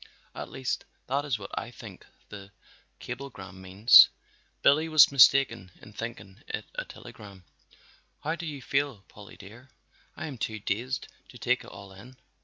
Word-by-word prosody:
At - - -7
least 130 -1 -3 0.2
that 140 +3 -1
is 135 -5 -1
what 100 -1 -10
I 115 - -4
think 110 -5 -12 0.2
the 100 -2 -10 0.5
cablegram 100 -9 -9
means. 95 +6 +7 0.5
Billy 155 +3 +4
was 155 -3 +7
mistaken 135 -7 +5
in 105 - -15
thinking 105 -2 -8
it - - -5
a - - -4
telegram. 100 - -13 0.8
How 155 - -1
do 170 0 -6
you 145 -4 -7
feel, 140 -7 -1
Polly 105 -1 -14
dear? 115 +7 -14 0.5
I - - -5
am 140 -6 -8
too 110 0 -3
dazed 120 +6 -3 0.2
to - - -13
take - - 0
it - - -14
all 100 -1 -12
in." 120 +7 -14
115 Hz, 160 wpm, -28 LUFS, 100-140 Hz, 0.8 s, means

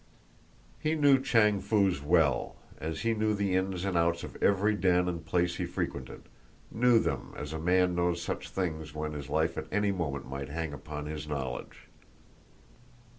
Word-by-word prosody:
He 155 +1 0
knew 140 -3 +5
Chang 115 -7 +3
Foo's 100 -8 +2
well 75 -4 +2 0.2
as 80 0 -4
he 115 - +1
knew 110 -1 +1
the 100 -2 0
ins 95 0 -1
and 95 -2 -1
outs 85 0 +2
of - - -8
every 100 +2 +3
den 90 -3 +2
and 85 -2 -3
place 85 +2 0
he - - -1
frequented, - - -4 0.5
knew 120 +1 +4
them 70 - -1
as 70 +1 -5
a 80 - -3
man 90 +2 +3
knows 85 0 +1
such 85 - -4
things 80 -5 -3
when 75 0 -3
his 75 -1 -6
life 80 +2 +1
at - - -7
any 105 0 +2
moment 70 -7 -3
might 70 0 -5
hang 80 0 -3
upon 75 +1 -6
his 75 0 -5
knowledge. 65 -4 -5
85 Hz, 175 wpm, -30 LUFS, 75-100 Hz, 0.5 s, knew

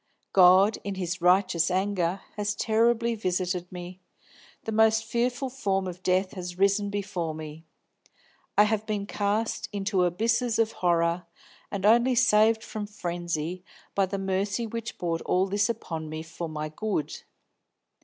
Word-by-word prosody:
God, 190 +3 +6
in 200 -1 -4
His 180 -1 -3
righteous 180 -1 +3
anger, 185 -1 0
has 210 0 -1
terribly 230 +1 +2
visited 180 -3 -2
me. 180 +1 -8 0.6
The 225 - -4
most 220 0 +4
fearful 245 +3 -1
form 195 -7 -1
of 180 0 -6
death 185 +1 +1
has 180 -2 -7
risen 200 +1 +2
before 180 -5 -3
me; 155 +1 -9 0.9
I 205 - +8
have 210 0 0
been 210 -2 -2
cast 215 +2 -1
into 200 -2 0
abysses 225 +6 +1
of 225 -1 +2
horror, 170 0 +1 0.4
and 200 -1 -3
only 240 +4 +5
saved 220 -2 +4
from 210 -1 -5
frenzy 175 -3 -4 0.3
by 195 -1 +2
the 195 +2 -3
mercy 195 +3 -1
which 230 +1 -5
brought 165 -2 -2
all 185 +1 +1
this 205 +3 +1
upon 165 -9 -4
me 155 +1 -5
for 165 +1 -6
my 155 0 -4
good. 155 -3 -3
195 Hz, 145 wpm, -27 LUFS, 180-220 Hz, 0.9 s, I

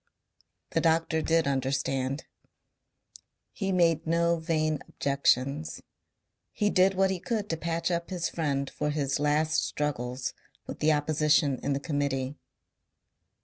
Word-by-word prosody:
The - - +1
doctor 160 -1 +2
did 165 +1 +2
understand. 135 +1 -1 1.3
He 195 -2 -2
made 165 -4 +2
no 170 +1 +2
vain 155 -2 0
objections. 140 +1 0 0.7
He 205 -1 +1
did 190 +1 +4
what 190 0 +3
he 190 - -2
could 205 +3 -2
to - - +1
patch 170 +2 -1
up 170 0 -2
his 180 -2 -1
friend 140 -4 -1
for 150 +2 -3
his 140 -2 -1
last 150 +2 +2
struggles 130 -3 -2 0.3
with - - -7
the 155 - +3
opposition 150 -2 +2
in 140 - 0
the 140 - -1
Committee. 140 -3 -1
155 Hz, 130 wpm, -28 LUFS, 140-170 Hz, 1.3 s, did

